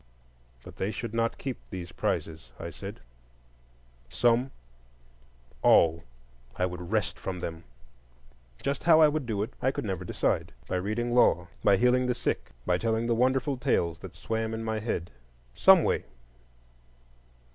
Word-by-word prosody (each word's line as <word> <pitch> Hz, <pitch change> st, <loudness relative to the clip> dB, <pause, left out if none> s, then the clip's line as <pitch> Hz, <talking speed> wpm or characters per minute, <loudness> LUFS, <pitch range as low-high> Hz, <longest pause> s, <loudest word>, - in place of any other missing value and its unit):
But -, -, -12 dB
they 95 Hz, -, -1 dB
should 115 Hz, +1 st, -5 dB
not 115 Hz, 0 st, 0 dB
keep 130 Hz, -2 st, -5 dB
these 90 Hz, -2 st, -7 dB
prizes, 80 Hz, -7 st, -3 dB
I -, -, -5 dB
said; -, -, -8 dB, 1.1 s
some, 120 Hz, +2 st, +2 dB, 1.1 s
all, 85 Hz, 0 st, +5 dB, 0.5 s
I 90 Hz, -, +1 dB
would 90 Hz, -1 st, -6 dB
wrest 110 Hz, -2 st, 0 dB
from 95 Hz, -1 st, -4 dB
them. 80 Hz, -1 st, -6 dB, 1.0 s
Just 140 Hz, 0 st, -2 dB
how 165 Hz, -2 st, +7 dB
I 155 Hz, -, +8 dB
would 150 Hz, -3 st, -2 dB
do 105 Hz, -3 st, -1 dB
it 115 Hz, -, -7 dB
I 130 Hz, -, +3 dB
could 135 Hz, -, -3 dB
never 95 Hz, -3 st, -3 dB
decide: 90 Hz, -, -1 dB
by 90 Hz, -, -1 dB
reading 110 Hz, +6 st, -2 dB
law, 90 Hz, -8 st, +4 dB
by 100 Hz, -1 st, +5 dB
healing 125 Hz, +3 st, +3 dB
the 125 Hz, -, +1 dB
sick, -, -, -2 dB, 0.2 s
by 90 Hz, 0 st, +1 dB
telling 115 Hz, 0 st, 0 dB
the 120 Hz, -, +2 dB
wonderful 130 Hz, +3 st, +1 dB
tales 85 Hz, -9 st, 0 dB
that -, -, -10 dB
swam 110 Hz, 0 st, -2 dB
in 110 Hz, -, -4 dB
my 110 Hz, -1 st, -2 dB
head,—some -, -, +1 dB
way. -, -, 0 dB
110 Hz, 150 wpm, -28 LUFS, 90-120 Hz, 1.1 s, I